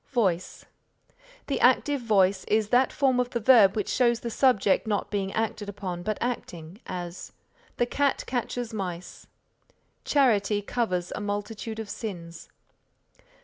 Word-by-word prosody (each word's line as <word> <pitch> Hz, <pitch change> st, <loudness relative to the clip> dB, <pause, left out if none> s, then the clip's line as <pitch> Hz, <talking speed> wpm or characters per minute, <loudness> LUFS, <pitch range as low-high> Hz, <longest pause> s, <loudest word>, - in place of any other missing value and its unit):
VOICE 190 Hz, -9 st, -1 dB, 0.8 s
The -, -, -2 dB
active 285 Hz, -2 st, +3 dB
voice 195 Hz, -4 st, +2 dB
is 215 Hz, -1 st, +1 dB
that 250 Hz, +2 st, +3 dB
form 265 Hz, -3 st, +2 dB
of 250 Hz, -1 st, 0 dB
the 240 Hz, -, -2 dB
verb 215 Hz, -4 st, +6 dB
which 210 Hz, -, -1 dB
shows 240 Hz, -2 st, +2 dB
the 235 Hz, -, -4 dB
Subject 225 Hz, -5 st, +2 dB
not 210 Hz, -2 st, -1 dB
being 195 Hz, -2 st, -1 dB
acted 220 Hz, -2 st, -2 dB
upon 190 Hz, -3 st, -5 dB
but 215 Hz, +3 st, -2 dB
acting; 185 Hz, -6 st, -5 dB
as, 175 Hz, 0 st, -6 dB, 0.4 s
"The 240 Hz, -, +2 dB
cat 280 Hz, +3 st, 0 dB
catches 245 Hz, -1 st, -3 dB
mice." 180 Hz, -4 st, -6 dB, 0.8 s
"Charity 210 Hz, -7 st, +2 dB
covers 185 Hz, -6 st, -2 dB
a -, -, -5 dB
multitude 205 Hz, +2 st, -4 dB
of 220 Hz, -1 st, -5 dB
sins." 170 Hz, -7 st, -7 dB
215 Hz, 140 wpm, -26 LUFS, 190-240 Hz, 0.8 s, verb